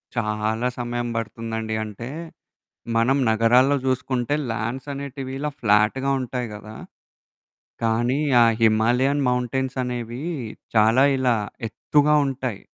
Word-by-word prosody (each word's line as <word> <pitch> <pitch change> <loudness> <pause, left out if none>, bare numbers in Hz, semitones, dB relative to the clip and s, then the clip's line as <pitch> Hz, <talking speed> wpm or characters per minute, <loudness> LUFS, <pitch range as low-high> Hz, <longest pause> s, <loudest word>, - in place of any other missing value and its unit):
చాలా 110 +1 -1
సమయం 120 0 -2
పడుతుందండి. 110 0 -3
అంటే, 110 +3 -7 0.9
మనం 125 +5 +3
నగరాల్లో 120 +5 +4
జూసుకుంటే 130 +1 0 0.2
ల్యాండ్స్ 120 +5 -4
అనేటివి, 135 -1 -6
ఇలా 150 0 -2
ఫ్లాట్‌గా 110 +5 +3
ఉంటాయి 125 -1 -4
గదా! 105 +1 -10 1.1
కానీ 120 +5 +1 0.2
ఆ - - +7 0.2
హిమాలయన్ 120 +6 +3
మౌంటైన్స్ 125 +2 -1
అనేవీ, 120 +2 -5 0.5
చాలా 110 +4 +5 0.2
ఇలా 125 -2 +2 0.3
ఎత్తుగా 150 +6 +2
ఉంటాయి. 130 -6 -3
120 Hz, 105 wpm, -23 LUFS, 110-130 Hz, 1.1 s, ఆ